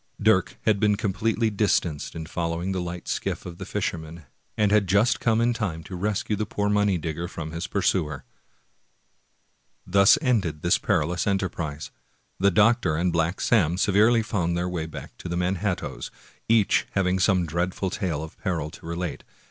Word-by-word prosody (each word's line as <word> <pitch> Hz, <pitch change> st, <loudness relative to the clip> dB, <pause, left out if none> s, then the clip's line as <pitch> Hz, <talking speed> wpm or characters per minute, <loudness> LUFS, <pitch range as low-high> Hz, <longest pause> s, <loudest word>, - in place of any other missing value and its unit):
Dirk 100 Hz, -4 st, +2 dB
had 105 Hz, -2 st, +2 dB
been 105 Hz, -1 st, +3 dB
completely 110 Hz, +2 st, 0 dB
distanced 90 Hz, -7 st, 0 dB
in 80 Hz, -1 st, -5 dB
following 85 Hz, +2 st, -2 dB
the 95 Hz, -1 st, -1 dB
light 90 Hz, 0 st, -6 dB
skiff -, -, -3 dB
of 85 Hz, -1 st, -8 dB
the -, -, -6 dB
fisherman, 80 Hz, +1 st, -4 dB, 0.3 s
and 105 Hz, -1 st, +2 dB
had 105 Hz, -2 st, +3 dB
just 100 Hz, +6 st, +3 dB
come 115 Hz, -1 st, +2 dB
in 120 Hz, +1 st, +2 dB
time 90 Hz, -9 st, -3 dB
to 90 Hz, -, -8 dB
rescue 105 Hz, +3 st, -1 dB
the 105 Hz, 0 st, -3 dB
poor 105 Hz, 0 st, -1 dB
money 105 Hz, -2 st, +2 dB
digger 80 Hz, +1 st, -4 dB
from 80 Hz, -2 st, -6 dB
his 85 Hz, +3 st, -4 dB
pursuer. 85 Hz, -7 st, 0 dB, 1.6 s
Thus 100 Hz, +3 st, +6 dB
ended 100 Hz, -, 0 dB
this 85 Hz, -, +3 dB
perilous 90 Hz, +3 st, 0 dB
enterprise. 85 Hz, -6 st, -2 dB, 0.5 s
The 100 Hz, +1 st, +4 dB
doctor 105 Hz, -3 st, +3 dB
and 85 Hz, +2 st, 0 dB
Black 85 Hz, +2 st, 0 dB
Sam 90 Hz, -7 st, +2 dB
severally 110 Hz, +4 st, +4 dB
found 90 Hz, -6 st, -1 dB
their 90 Hz, +1 st, -1 dB
way 85 Hz, -3 st, -3 dB
back 80 Hz, -, -9 dB
to 90 Hz, -, -7 dB
the 85 Hz, -, -2 dB
Manhat 90 Hz, +1 st, 0 dB
toes, -, -, -6 dB, 0.4 s
each 110 Hz, -3 st, +3 dB
having 95 Hz, -1 st, +1 dB
some 95 Hz, -2 st, +3 dB
dreadful 90 Hz, +3 st, -2 dB
tale 85 Hz, -8 st, -2 dB
of 80 Hz, -, -10 dB
peril 80 Hz, -5 st, -2 dB
to 95 Hz, -, -13 dB
relate. 85 Hz, -2 st, -4 dB
90 Hz, 170 wpm, -25 LUFS, 85-105 Hz, 1.6 s, Thus